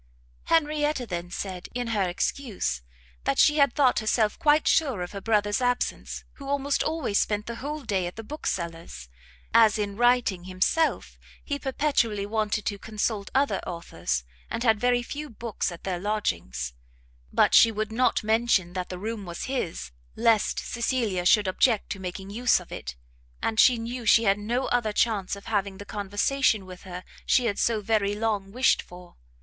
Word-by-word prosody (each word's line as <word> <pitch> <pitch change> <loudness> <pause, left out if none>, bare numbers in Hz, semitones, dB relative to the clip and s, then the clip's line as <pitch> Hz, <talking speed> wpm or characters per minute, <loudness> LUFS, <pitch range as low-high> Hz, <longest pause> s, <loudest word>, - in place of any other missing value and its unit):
Henrietta 300 -4 +1
then 175 -4 -5
said, 180 0 -5
in 245 -1 -2
her 200 -5 +1
excuse, 185 - -2 0.4
that 135 - +1
she 300 0 +5
had 280 -4 +4
thought 265 -4 +4
herself 215 -1 +1
quite 300 0 +3
sure 270 - +2
of 175 - -7
her 200 - -6
brother's 210 +1 +1
absence, 245 0 -1
who 275 -1 -8
almost 280 0 0
always 310 -10 0
spent 210 0 0
the 235 0 -6
whole 295 +3 -5
day 195 -6 -1
at 175 - -8
the 225 - -7
bookseller's, 170 - -5 0.4
as 225 -1 +6
in 205 -1 -2
writing 240 -6 +2
himself 185 - 0 0.2
he 285 -1 -3
perpetually 260 -7 0
wanted 215 0 -1
to 200 -1 -2
consult 215 -1 -2
other 280 +1 +2
authors, 85 - -3 0.3
and 230 - -3
had 220 -3 +3
very 245 0 +2
few 295 +4 -6
books 225 -4 -3
at 170 - -10
their 185 -2 -2
lodgings: 85 - -2 0.6
but - - +3
she 230 - +8
would 215 0 -3
not 250 +1 +2
mention 220 -5 +2
that 185 -1 -4
the 180 - -5
room 215 +2 -4
was 170 -2 -6
his, 255 - -3 0.2
lest 225 -2 +2
Cecilia 230 -7 -1
should 210 0 +5
object 215 +3 +2
to 195 - -4
making 190 +1 -6
use 240 +3 +3
of - - -14
it, 60 0 -6 0.4
and 220 -1 -1
she 250 -2 +6
knew 235 +1 -5
she 230 - +6
had 200 -1 +3
no 240 +5 -1
other 235 -3 +1
chance 205 -4 +1
of 200 - -12
having 200 -3 -1
the 205 - -9
conversation 205 +2 0
with 185 -1 -11
her 180 0 -7 0.2
she 250 - +3
had 205 -3 -1
so 225 -2 +1
very 205 -1 +1
long 210 -3 -1
wished 255 +4 +3
for. 180 0 -14
215 Hz, 175 wpm, -26 LUFS, 190-245 Hz, 0.6 s, she